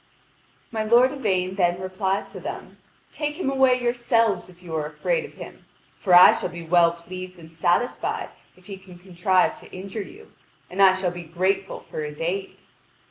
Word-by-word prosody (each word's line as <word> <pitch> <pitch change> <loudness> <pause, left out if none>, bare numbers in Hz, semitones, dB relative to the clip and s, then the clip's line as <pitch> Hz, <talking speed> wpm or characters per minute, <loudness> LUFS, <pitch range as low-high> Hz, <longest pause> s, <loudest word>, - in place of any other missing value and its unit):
My 220 -2 -2
lord 240 +4 +5
Yvain 190 -8 -1
then 175 -1 +2
replies 190 +1 -2
to - - -8
them: - - -8 0.3
"Take 300 -1 -3
him 275 - 0
away 265 -2 +3
yourselves 235 -5 +1
if 180 0 -18
you 170 -2 -8
are 150 -1 -1
afraid 470 - -1
of - - -13
him. - - -11 0.3
For 185 -3 +4
I 180 - +10
shall - - -3
be 170 -1 -8
well 170 0 +4
pleased 185 +2 -9
and 165 -1 -14
satisfied 175 +9 0 0.3
if 185 - -22
he 195 0 -8
can 190 -2 -15
contrive 185 +1 +1
to - - -16
injure 195 +3 -6
you, 410 - -12 0.4
and 190 +2 -1
I 190 -1 +7
shall 190 -2 -1
be 175 0 -7
grateful 185 +4 -2
for 155 - -6
his 150 0 -7
aid." 190 +4 -3
185 Hz, 185 wpm, -24 LUFS, 175-220 Hz, 0.4 s, I